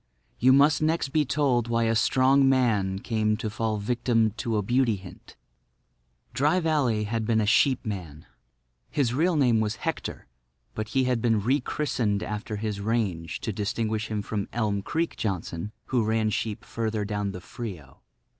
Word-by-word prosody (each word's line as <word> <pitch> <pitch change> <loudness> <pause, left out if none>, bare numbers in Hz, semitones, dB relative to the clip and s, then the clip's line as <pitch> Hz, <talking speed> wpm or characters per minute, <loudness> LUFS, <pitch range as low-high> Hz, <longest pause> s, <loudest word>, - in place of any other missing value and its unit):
You 130 +2 +5
must 145 +3 +5
next 155 -2 +1
be 150 +2 +2
told 130 -4 +1
why 115 0 +1
a 115 0 +2
strong 135 +4 +4
man 110 -8 +2
came 110 0 0
to 110 -1 -4
fall 110 0 -1
a - - -3
victim 115 0 +1
to 115 -2 -1
a 105 - 0
Beauty 120 +1 +2
Hint. 95 -2 -13 1.0
Dry 150 +7 +2
Valley 145 -10 +1
had 115 +2 -2
been 110 0 +2
a 110 - +1
sheepman. 100 - 0 0.6
His 130 -5 0
real 165 +6 +2
name 125 -6 +3
was 110 0 0
Hector, 165 +7 -4 0.5
but 110 0 -4
he 130 - +4
had 125 -2 0
been 115 -3 +2
rechristened 125 -4 0
after 105 +1 -4
his 105 -1 -3
range 100 -7 -2
to 110 - -3
distinguish 110 +1 -2
him 105 -2 -3
from 100 -1 -3
"Elm 105 -4 -1
Creek" 165 +10 -2
Johnson, 95 -1 -3
who 125 -3 +1
ran 110 0 +1
sheep 105 -1 -3
further 110 -2 -2
down 105 -1 -2
the 90 - -7
Frio. 90 - -8
110 Hz, 165 wpm, -26 LUFS, 105-130 Hz, 1.0 s, You